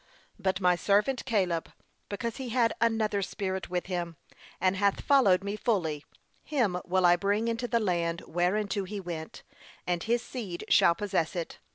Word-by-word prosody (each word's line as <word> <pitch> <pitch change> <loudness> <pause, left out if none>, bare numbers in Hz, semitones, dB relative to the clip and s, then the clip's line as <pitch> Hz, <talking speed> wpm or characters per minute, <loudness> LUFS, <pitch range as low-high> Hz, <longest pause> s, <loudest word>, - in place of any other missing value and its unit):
'But 190 -1 0
my 180 -2 +4
servant 210 +8 +1
Caleb, 185 -9 0 0.4
because 225 +3 -4
he 260 -2 -5
had 235 -1 +2
another 220 -3 +1
spirit 190 -1 -3
with 180 0 -2
him, 175 -3 -4 0.4
and 185 +1 +2
hath 200 +1 +1
followed 205 -10 +4
me 200 +1 -3
fully, 170 -10 -1 0.4
him 215 -12 0
will 185 0 +2
I 175 0 +7
bring 205 +5 0
into 230 +1 -1
the 235 -1 +1
land 170 -5 0
whereinto 190 +4 -1
he 205 +2 -5
went; 170 -4 -7 0.4
and 175 -1 -1
his 235 +3 0
seed 200 -9 -6
shall 170 - +5
possess 190 -5 -1
it.' 170 -2 -5
195 Hz, 165 wpm, -29 LUFS, 175-220 Hz, 0.4 s, I